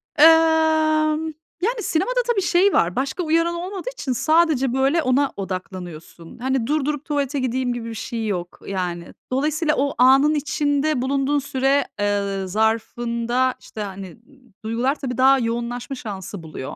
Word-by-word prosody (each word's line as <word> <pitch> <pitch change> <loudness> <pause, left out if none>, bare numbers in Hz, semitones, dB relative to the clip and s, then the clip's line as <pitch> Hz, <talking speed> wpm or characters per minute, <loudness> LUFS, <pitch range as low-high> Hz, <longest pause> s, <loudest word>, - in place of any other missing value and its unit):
Emm, 315 0 +4 0.3
yani, 450 +3 -1
sinemada - - 0
tabii 470 -5 +1
şey 370 +2 +3
var, 175 +1 +2
başka 270 +7 -2
uyaran 330 +1 +1
olmadığı 370 +6 -5
için 280 - -4
sadece, 305 -1 +2
böyle, 270 +5 +2
ona 275 0 +2
odaklanıyorsun. 180 -3 -7
Hani, 260 -1 -1
durdurup 295 0 -1
tuvalete 285 -2 -1
gideyim 255 -1 -1
gibi 235 -1 -5
bir - - -6
şey 225 -1 -4
yok. 175 -3 -4
Yani, 175 -3 -4 0.2
dolayısıyla 300 +3 +1
o 280 +1 0
anın 270 +4 +5
içinde 290 -1 0
bulunduğun 275 +2 +1
süre, 270 0 +1 0.2
ııı, 200 -2 -1
zarfında, 235 +4 0
işte, 215 - -9
hani, 195 -3 -7 0.5
duygular 240 +5 0
tabii 250 -3 -4
daha 265 +1 +5
yoğunlaşma 240 +2 -3
şansı 200 -6 -7
buluyor. 155 -4 -7
265 Hz, 140 wpm, -22 LUFS, 225-310 Hz, 0.5 s, anın